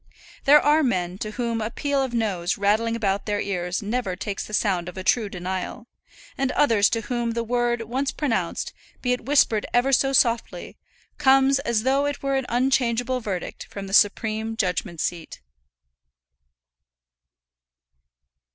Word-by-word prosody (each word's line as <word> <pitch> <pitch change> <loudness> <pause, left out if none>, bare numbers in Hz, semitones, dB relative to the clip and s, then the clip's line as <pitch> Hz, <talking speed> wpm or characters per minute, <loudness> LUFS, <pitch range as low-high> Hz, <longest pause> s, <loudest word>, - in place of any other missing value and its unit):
There 295 +1 +8
are 300 +2 +3
men 185 - -1
to 215 - -3
whom 230 0 -2
a 215 - -2
peal 280 +3 -1
of 265 -2 -2
noes 200 -7 -1
rattling 215 +3 +1
about 200 -3 -1
their 205 -1 0
ears 180 0 -2
never 215 -3 -2
takes 200 +1 -4
the 215 - -11
sound 180 -5 0
of 180 - -12
a 185 - -5
true 220 +1 +2
denial, 185 +3 -5 0.5
and 270 -1 -1
others 225 -8 +4
to 230 - -1
whom 235 0 -2
the 235 0 -2
word 240 0 0
once 260 +5 -2
pronounced, 275 -7 -2 0.3
be 250 -1 +2
it 250 - -5
whispered 255 -7 +3
ever 260 +3 +3
so 270 +1 +3
softly, 235 -3 +1 0.4
comes 270 +1 +4
as 235 -5 0
though 275 +2 +2
it 290 -1 -4
were 275 0 0
an 265 -2 -1
unchangeable 245 0 +1
verdict 195 -6 -5
from 200 -1 -7
the 195 - -8
supreme 220 +2 +2
judgment 180 -3 -2
seat. 170 -1 -4
230 Hz, 155 wpm, -24 LUFS, 200-260 Hz, 0.5 s, There